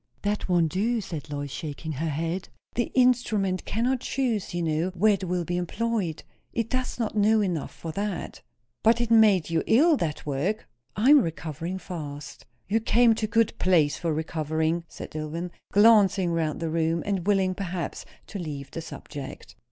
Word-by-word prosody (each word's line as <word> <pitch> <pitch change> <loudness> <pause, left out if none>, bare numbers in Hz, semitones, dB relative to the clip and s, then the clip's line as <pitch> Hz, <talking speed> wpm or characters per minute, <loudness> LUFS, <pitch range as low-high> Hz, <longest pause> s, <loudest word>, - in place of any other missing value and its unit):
"That 205 -1 -1
won't 170 -3 +3
do," 225 +6 +1
said 160 -7 -6
Lois, 145 -1 -4
shaking 155 +2 -5
her 155 +3 -2
head. 165 +5 -3 0.2
"The 240 - -1
instrument 225 -7 +2
cannot 250 +4 0
choose, 240 -7 -1
you 175 -1 -2
know, 160 +2 0
where 210 +4 +4
it 195 -1 -2
will 180 -1 -1
be 175 +2 -2
employed. 195 -2 -2 0.3
It 230 -1 -2
does 255 -1 -2
not 225 -3 -2
know 215 +1 +4
enough 175 -7 -1
for 165 - -7
that." 200 0 -4 0.4
"But 230 +1 +4
it 235 -1 -1
made 210 -7 +5
you 165 -1 +2
ill, 300 +6 +5
that 155 -7 -3
work." 150 +9 -2 0.3
"I 235 +8 +4
am 295 -2 +8
recovering 165 - -4
fast." 150 -6 -8 0.2
"You 215 +5 +2
came 230 +1 +4
to 220 0 -2
a - - -20
good 230 -1 +2
place 165 -6 +3
for 170 -2 -1
recovering," 160 +1 -1
said - - -9
Dillwyn, 155 +3 -4 0.2
glancing 200 -4 +5
round 160 -1 -1
the 165 -1 -2
room, 165 0 0
and 195 -3 -2
willing, 190 -2 +3
perhaps, 180 -3 -4 0.2
to 200 - -7
leave 145 -5 -6
the 165 - -5
subject. 145 -3 -9
180 Hz, 175 wpm, -26 LUFS, 160-220 Hz, 0.4 s, am